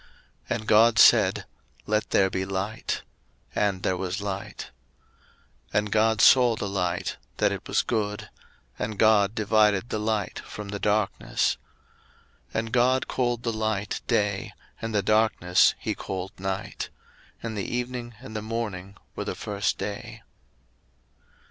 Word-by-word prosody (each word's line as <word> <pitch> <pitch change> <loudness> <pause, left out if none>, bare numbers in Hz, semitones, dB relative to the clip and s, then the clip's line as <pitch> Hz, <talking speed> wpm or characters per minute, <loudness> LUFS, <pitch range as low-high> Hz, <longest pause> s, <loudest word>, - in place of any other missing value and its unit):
01:001:003 - - +1
And 110 - -13
God 110 +1 +5
said, - - +6 0.4
Let 105 0 0
there 95 -1 +3
be 95 - -1
light: 95 +3 -3 0.5
and 100 -3 0
there 95 - +1
was 95 +2 -3
light. 100 -1 -5 1.0
01:001:004 - - +5
And 105 0 0
God 110 0 +3
saw 125 -3 +7
the 105 - -3
light, 90 -3 -2 0.2
that - - +3
it - - -5
was - - +2
good: 105 -2 -2 0.5
and 105 0 -3
God 105 -1 +4
divided 105 0 +3
the 110 - -2
light 105 -2 -1
from 105 -1 -8
the 100 0 -4
darkness. 105 -1 0 0.9
01:001:005 - - -28
And 110 0 -2
God 125 +1 +3
called 120 -2 -1
the 115 - -1
light 110 -2 -2
Day, 105 -4 0 0.3
and 115 -1 -3
the 100 - +2
darkness 105 -4 +3
he - - -2
called 95 0 -5
Night. 95 0 -4 0.5
And 115 -1 -4
the 100 - -2
evening 120 -1 -4
and 130 -4 -10
the 110 - -2
morning 105 -4 -4 0.2
were - - -4
the - - -3
first 100 -1 -1
day. 105 +3 -6
105 Hz, 150 wpm, -26 LUFS, 100-110 Hz, 1.0 s, saw